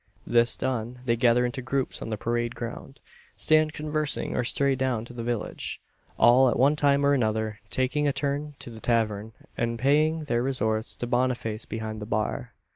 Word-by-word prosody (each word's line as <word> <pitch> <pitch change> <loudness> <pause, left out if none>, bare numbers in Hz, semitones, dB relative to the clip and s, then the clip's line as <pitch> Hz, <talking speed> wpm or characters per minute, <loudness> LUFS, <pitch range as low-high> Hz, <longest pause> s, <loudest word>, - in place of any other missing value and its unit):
This 120 0 +3
done, 125 0 -3
they 115 -2 +2
gather 120 +1 +3
into 125 +2 -3
groups 130 +1 -2
on - - -5
the 110 - -2
parade 120 +2 -1
ground; 120 +3 -7 0.4
stand 155 0 +3
conversing 150 -1 -1
or 125 - +1
stray 140 +3 +2
down 130 -4 -1
to 120 - -11
the 120 - -6
village; 120 -2 -4 0.4
all, 125 +2 +6
at - - 0
one 140 +4 +4
time 140 -1 +3
or 140 - +4
another, 110 -4 0
taking 140 +3 0
a - - +3
turn 140 +2 -1
into 120 - -9
the 110 - -9
tavern, 110 -2 0 0.2
and 115 0 -1
paying 155 +5 +2
their 120 -5 0
respects 110 -4 -1
to - - -4
Boniface 120 -3 -1
behind 110 0 -5
the 105 - -6
bar. 110 -1 -2
120 Hz, 185 wpm, -26 LUFS, 115-140 Hz, 0.4 s, all